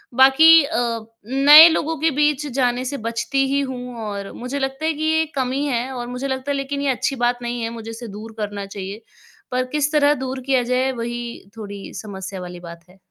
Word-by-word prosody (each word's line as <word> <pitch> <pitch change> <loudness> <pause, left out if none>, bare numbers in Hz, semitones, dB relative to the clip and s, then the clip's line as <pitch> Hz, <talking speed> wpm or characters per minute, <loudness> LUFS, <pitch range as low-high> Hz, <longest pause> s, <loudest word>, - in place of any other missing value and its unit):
बाकी 295 +5 +7
अ, 240 -6 -1 0.3
नए 285 +6 +9
लोगों 320 0 -1
के 320 - +3
बीच 295 -1 +2
जाने 250 -1 0
से 280 +2 -3
बचती 270 +4 0
ही 275 +1 +1
हूँ 250 -2 -6
और 200 -1 -5
मुझे 255 +3 -5
लगता 270 +3 -3
है 320 - +1
कि 310 +1 -5
ये 320 0 +2
कमी 265 +2 -1
है 255 -1 -2
और 240 -1 -5
मुझे 250 +3 -4
लगता 265 +1 -3
है 280 - -1
लेकिन 280 +1 -3
ये 280 -2 +1
अच्छी 270 +2 -2
बात 245 0 0
नहीं 240 0 -3
है 225 - -2
मुझे 225 -1 -8
इसे 230 +1 -8
दूर 215 +2 -9
करना 205 -1 -4
चाहिए। 200 +2 -7 0.5
पर 255 0 0
किस 300 0 +1
तरह 295 -1 +4
दूर 260 0 -5
किया 260 -2 +2
जाए 255 +2 0
वही 235 -3 -6
थोड़ी 205 -2 -8
समस्या 190 -2 -7
वाली 180 0 -8
बात 170 -1 -11
है। 185 - -20
255 Hz, 210 wpm, -21 LUFS, 225-280 Hz, 0.5 s, नए